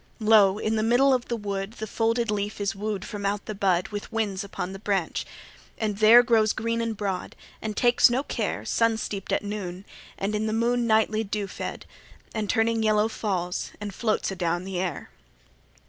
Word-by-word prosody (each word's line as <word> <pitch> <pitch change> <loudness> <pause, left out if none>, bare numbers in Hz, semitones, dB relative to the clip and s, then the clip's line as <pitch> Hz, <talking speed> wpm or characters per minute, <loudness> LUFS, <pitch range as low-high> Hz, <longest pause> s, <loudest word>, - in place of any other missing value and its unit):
3 215 - -5
Lo! 205 -3 +6
in 220 +1 -1
the - - +1
middle 245 +5 +4
of 250 -2 0
the 235 - -1
wood, 200 -1 -4
The 220 - -5
folded 230 +1 0
leaf 205 0 -2
is 200 -1 -1
woo'd 205 -1 -3
from 205 -3 -6
out 200 0 -1
the 215 - -4
bud 190 -3 +1
With 205 +1 -6
winds 210 -3 -1
upon 190 -1 -5
the 195 - -8
branch, 195 -5 -1 0.5
and 210 -2 -2
there 225 +3 +8
Grows 225 -3 +3
green 230 +1 -1
and 230 -2 -2
broad, 195 -3 -3 0.3
and 215 -1 -4
takes 240 0 +5
no 255 +3 0
care, - - -3
Sun 230 -1 +2
steep'd 200 -3 -5
at - - +1
noon, 200 -2 -5 0.3
and 200 +2 -2
in 215 +1 0
the 215 - -1
moon 235 +1 +1
Nightly 220 0 +2
dew 205 0 -3
fed; 195 - -6 0.5
and 215 -2 -2
turning 225 -1 +2
yellow 215 0 +3
Falls, 185 -5 -3
and 205 -1 -5
floats 215 -1 0
adown 175 -1 -1
the 190 -1 -4
air. 180 -5 -4
210 Hz, 195 wpm, -26 LUFS, 195-225 Hz, 0.5 s, there